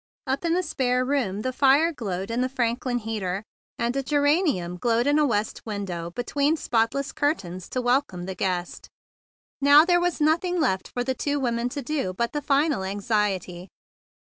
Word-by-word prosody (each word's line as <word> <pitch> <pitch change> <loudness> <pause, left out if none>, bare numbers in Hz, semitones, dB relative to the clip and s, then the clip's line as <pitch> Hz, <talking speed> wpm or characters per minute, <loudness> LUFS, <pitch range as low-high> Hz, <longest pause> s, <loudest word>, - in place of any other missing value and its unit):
Up 270 +2 -2
in 335 0 +1
the 365 - +1
spare 255 -5 0
room 245 -8 -1
the 255 - -2
fire 285 +5 +4
glowed 195 -5 -4
in 240 +2 0
a 255 - -1
Franklin 245 -1 -1
heater, 210 -4 -3 0.3
and 235 +2 -1
a 275 - +1
ge¬ 290 +2 0
ranium 285 - +1
glowed 235 +5 +1
in 290 +1 +3
a 300 - +3
west 215 -3 -1
window 195 -6 -4
be¬ 240 +8 -5
tween 290 +3 +1
spotless 255 +3 0
curtains 185 - -2
to 255 - -2
welcome 245 -8 +1
the 190 - -4
guest; 180 -1 -3 0.7
and 280 - 0
now 295 +2 +9
there 350 0 +3
was 355 -1 0
nothing 335 +4 +2
left 190 - 0
for 245 - -3
the 260 +1 -1
two 285 +3 -1
women 240 -2 -1
to 280 +2 -5
do 270 -9 -2
but 235 +5 -2
the 295 - -2
final 285 -4 +1
anxiety. 195 -3 -2
245 Hz, 190 wpm, -25 LUFS, 200-285 Hz, 0.7 s, now